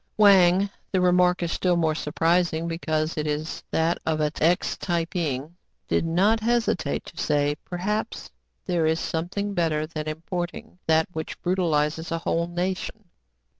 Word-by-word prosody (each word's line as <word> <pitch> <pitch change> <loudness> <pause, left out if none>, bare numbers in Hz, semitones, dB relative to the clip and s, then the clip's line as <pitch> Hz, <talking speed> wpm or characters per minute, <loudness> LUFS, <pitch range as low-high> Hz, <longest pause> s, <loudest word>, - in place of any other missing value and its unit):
Wang 195 -2 +6 0.2
(the 190 - +2
remark 180 0 +3
is 170 - -1
still 180 -1 +1
more 160 -2 +2
surprising 165 +2 +1
be 165 0 -3
cause 155 0 -1
it 150 - -1
is 150 +1 -3
that 165 +1 +1
of 160 -1 0
an 150 -1 +1
ex 175 +4 +2
Tai 170 -3 -1
ping) 155 -2 -3 0.3
did 165 - +1
not 195 +7 +3
hesitate 225 -10 0
to - - -12
say, 145 -1 +2
"Perhaps 210 +5 -3 0.3
there 170 -3 +1
is 160 +1 +1
something 195 +5 -2
better 160 -4 +1
than 155 -1 -6
importing 175 +6 -5
that 160 +2 +4
which 160 0 -5
brutalizes 160 -3 0
a 165 - 0
whole 165 0 -1
nation. 185 +4 -3
170 Hz, 155 wpm, -25 LUFS, 160-180 Hz, 0.3 s, Wang